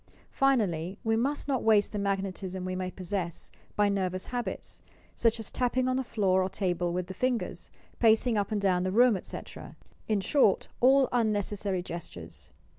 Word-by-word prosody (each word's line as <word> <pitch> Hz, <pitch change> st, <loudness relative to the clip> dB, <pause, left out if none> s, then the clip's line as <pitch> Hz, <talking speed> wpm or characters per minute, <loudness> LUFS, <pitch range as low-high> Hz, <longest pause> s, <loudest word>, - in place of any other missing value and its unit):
Finally, 195 Hz, -10 st, +1 dB
we 225 Hz, -1 st, +1 dB
must 275 Hz, +7 st, -1 dB
not 270 Hz, -3 st, 0 dB
waste 215 Hz, -2 st, +3 dB
the 210 Hz, -, -3 dB
magnetism 190 Hz, -2 st, -3 dB
we 185 Hz, 0 st, -3 dB
may 185 Hz, 0 st, -3 dB
possess 185 Hz, -2 st, -4 dB, 0.2 s
by 205 Hz, 0 st, +3 dB
nervous 185 Hz, -2 st, -1 dB
habits,— 245 Hz, -1 st, -5 dB, 0.3 s
such 230 Hz, 0 st, +1 dB
as 225 Hz, -, -5 dB
tapping 255 Hz, 0 st, 0 dB
on 255 Hz, -, +1 dB
the 265 Hz, -, 0 dB
floor 195 Hz, -6 st, +1 dB
or 185 Hz, -, 0 dB
table 180 Hz, -3 st, -1 dB
with 180 Hz, +1 st, -2 dB
the 190 Hz, -, -7 dB
fingers, 250 Hz, +4 st, -2 dB, 0.3 s
pacing 225 Hz, +1 st, +4 dB
up 205 Hz, -1 st, -1 dB
and 210 Hz, -2 st, 0 dB
down 185 Hz, -2 st, +2 dB
the 185 Hz, +1 st, -1 dB
room, 240 Hz, +2 st, +5 dB
etc., 185 Hz, -, -8 dB, 0.2 s
— -, -, -33 dB
in 215 Hz, -2 st, +2 dB
short, 210 Hz, 0 st, +2 dB
all 265 Hz, +1 st, +5 dB
unnecessary 205 Hz, -5 st, 0 dB
gestures. 160 Hz, -, -9 dB
200 Hz, 175 wpm, -29 LUFS, 185-235 Hz, 0.3 s, room